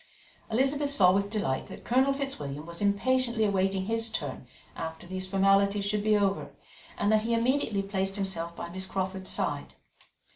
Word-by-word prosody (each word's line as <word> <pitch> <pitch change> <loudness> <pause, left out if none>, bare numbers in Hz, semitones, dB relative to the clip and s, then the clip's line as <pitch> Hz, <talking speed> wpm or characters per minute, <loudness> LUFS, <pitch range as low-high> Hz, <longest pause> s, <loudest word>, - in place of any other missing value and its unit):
Elizabeth 270 +5 +1
saw 195 -10 +5
with 200 +1 +1
delight 200 -11 -1
that - - -10
Colonel 260 +3 +3
Fitzwilliam 160 - -4
was 170 +2 -7
impatiently 235 +3 +2
awaiting 195 -1 +1
his 225 +2 0
turn 145 - -5 0.3
after 160 +1 -6
these 185 +1 -5
formalities 195 +1 +3
should 205 0 0
be 215 0 +4
over, 200 -1 0 0.5
and 205 +1 +2
that 215 0 +4
he 230 +1 0
immediately 230 -4 +1
placed 195 -1 -2
himself 170 -4 -3
by 170 - -5
Miss 190 +2 -4
Crawford's 190 0 -2
side. - - -1
200 Hz, 160 wpm, -29 LUFS, 190-225 Hz, 0.5 s, saw